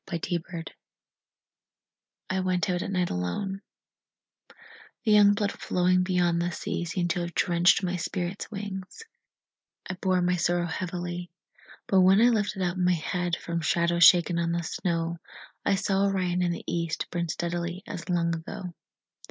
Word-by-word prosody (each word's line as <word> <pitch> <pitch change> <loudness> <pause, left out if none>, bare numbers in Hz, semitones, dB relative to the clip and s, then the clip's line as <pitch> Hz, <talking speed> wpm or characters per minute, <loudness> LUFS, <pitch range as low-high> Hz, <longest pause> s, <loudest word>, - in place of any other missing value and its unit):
Winter 170 +1 -1
Stars 170 -2 -5 1.7
I 190 - 0
went 185 0 0
out 175 -1 -1
at - - -4
night 180 -2 0
alone; 190 - -3 1.4
The 220 - +3
young 205 -1 +6
blood 205 -1 0
flowing 180 0 +1
beyond 175 -2 +1
the 175 +1 -1
sea 175 - -3
Seemed 175 0 -1
to 175 - -1
have 170 0 -4
drenched 175 +2 +3
my 180 0 -1
spirit's 180 +2 -4
wings 195 - -7 0.8
I 185 - -3
bore 185 -1 0
my 180 0 +2
sorrow 175 +1 +1
heavily. 175 0 -4 0.6
But 190 -1 +4
when 190 +2 +6
I 240 +2 +6
lifted 210 -4 0
up 180 +1 -1
my 180 0 +3
head 175 +2 -1
From 170 -1 -4
shadows 170 +2 +2
shaken 170 0 +6
on 170 0 0
the 170 0 -1
snow, 165 0 -2 0.4
I 195 - +2
saw 195 0 +1
Orion 180 -2 0
in 175 -1 +1
the 170 - -5
east 170 -1 -2
Burn 170 -1 -2
steadily 175 +2 -3
as 170 - -7
long 170 -1 +1
ago. 170 +2 -6
175 Hz, 160 wpm, -27 LUFS, 170-185 Hz, 1.7 s, young